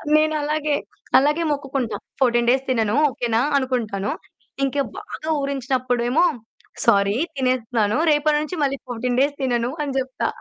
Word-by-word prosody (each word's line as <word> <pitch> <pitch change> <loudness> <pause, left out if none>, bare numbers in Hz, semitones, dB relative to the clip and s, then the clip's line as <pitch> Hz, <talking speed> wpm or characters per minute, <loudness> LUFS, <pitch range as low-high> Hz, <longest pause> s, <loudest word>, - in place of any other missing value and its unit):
నేనలాగే, 305 -1 +1 0.4
అలాగే 295 +5 +3
మొక్కుకుంటా. 270 -6 -2 0.2
14 240 -2 +3
డేస్ 265 +1 +2
తినను 225 -3 +1 0.2
ఓకే 245 -1 -3
నా 230 - +4 0.2
అనుకుంటాను. 225 -7 -1 0.5
ఇంకా 280 +1 0 0.2
బాగా 415 -6 -7
ఊరించినప్పుడు 255 -3 -1
ఏమో 310 +7 +4 0.6
సారీ 200 0 +4 0.2
తినేస్తున్నాను. 245 -4 0
రేపటి 295 0 +3
నుంచి 310 +4 -4
మళ్ళి 275 0 0
14 245 +1 -2
డేస్ 285 +1 +1
తినను 240 -1 0
అని 285 -2 -2
జెప్తా. 260 0 -2
260 Hz, 135 wpm, -22 LUFS, 240-285 Hz, 0.6 s, నా